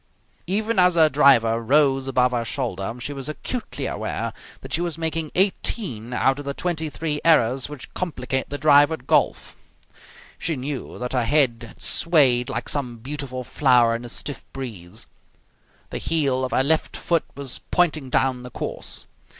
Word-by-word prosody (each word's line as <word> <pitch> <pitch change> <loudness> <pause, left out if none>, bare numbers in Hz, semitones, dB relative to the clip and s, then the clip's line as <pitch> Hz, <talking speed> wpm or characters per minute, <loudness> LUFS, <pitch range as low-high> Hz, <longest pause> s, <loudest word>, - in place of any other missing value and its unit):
Even 215 +3 0
as 180 -1 +5
her 160 -2 +6
driver 125 -6 +4
rose 135 +1 +3
above 125 -1 +2
her 120 -2 -1
shoulder 115 -5 -2
she 145 +4 -4
was 135 +1 -6
acutely 235 +10 -4
aware - - -3 0.3
that - - -8
she 165 - +2
was 170 -3 -3
making 160 -1 -2
eighteen 180 - 0
out 135 +2 +1
of 145 - -7
the 140 0 -3
twenty 160 -3 -2
three 150 +2 -2
errors 135 -5 +3
which 150 -3 -9
complicate 130 -7 -2
the 145 - -4
drive 145 +1 +5
at 160 -6 -5
golf. - - +1 0.8
She 160 - -1
knew 135 +1 -5
that 125 +1 -4
her 125 -3 +1
head 120 -3 +2
had - - -16
swayed 135 -8 +4
like - - -3
some 125 -5 -3
beautiful 130 +1 -5
flower 125 -3 +3
in 115 - -5
a 120 - -8
stiff 140 +3 -4
breeze. 110 -10 -5 0.9
The - - -3
heel 140 -5 +1
of 130 - -1
her 130 - +3
left 155 +3 +1
foot 170 -2 0
was 140 -3 -3
pointing 155 -6 +1
down 130 0 +1
the 125 - -9
course. - - -4
135 Hz, 170 wpm, -23 LUFS, 125-155 Hz, 0.9 s, her